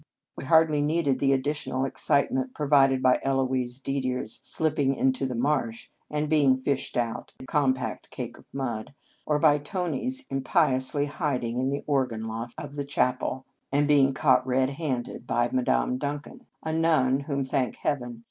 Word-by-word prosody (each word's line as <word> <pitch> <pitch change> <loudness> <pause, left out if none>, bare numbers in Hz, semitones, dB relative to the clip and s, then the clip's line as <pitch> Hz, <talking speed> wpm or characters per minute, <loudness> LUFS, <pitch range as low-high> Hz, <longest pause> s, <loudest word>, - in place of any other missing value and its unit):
We - - -7
hardly 160 -1 +4
needed 145 -3 +1
the 135 0 +3
additional 135 -1 0
excite 140 +1 +1
ment 130 -1 -2
provided 135 -3 +3
by 130 0 +4
Eloise 130 -2 0
Didier 130 -2 -2
s 110 - -5
slip 155 -1 -1
ping 135 -1 +2
into 130 0 +1
the 125 - -4
marsh, 120 -3 -1 0.2
and 150 0 -1
being 145 -4 +4
fished 130 0 -2
out, 115 -2 -2
a - - -9
compact 130 -3 -1
cake - - -6
of - - -18
mud; 130 -2 -4 0.3
or 150 - +2
by 150 -1 +4
Tony 180 - -3
s 265 +1 -2
impiously 135 -1 +1
hiding 130 -6 -2
in 130 +1 0
the 140 +1 -3
organ 125 -6 0
loft 115 +2 -5
of 145 0 -7
the 145 - -1
chapel, 130 -1 -1 0.3
and 145 +1 +2
being 140 -2 +5
caught 130 - +4
In - - -3
Our - - +1
Convent 130 0 +3
Days 140 +2 -9
red - - -5
handed 125 -2 -3
by 120 0 +1
Madame 125 - +1
Duncan, 145 - -5 0.2
a 160 - -2
nun 155 -5 +3
whom, 140 -1 -2
thank 130 -2 -1
Heaven! 125 -5 -3
135 Hz, 185 wpm, -26 LUFS, 130-145 Hz, 0.3 s, being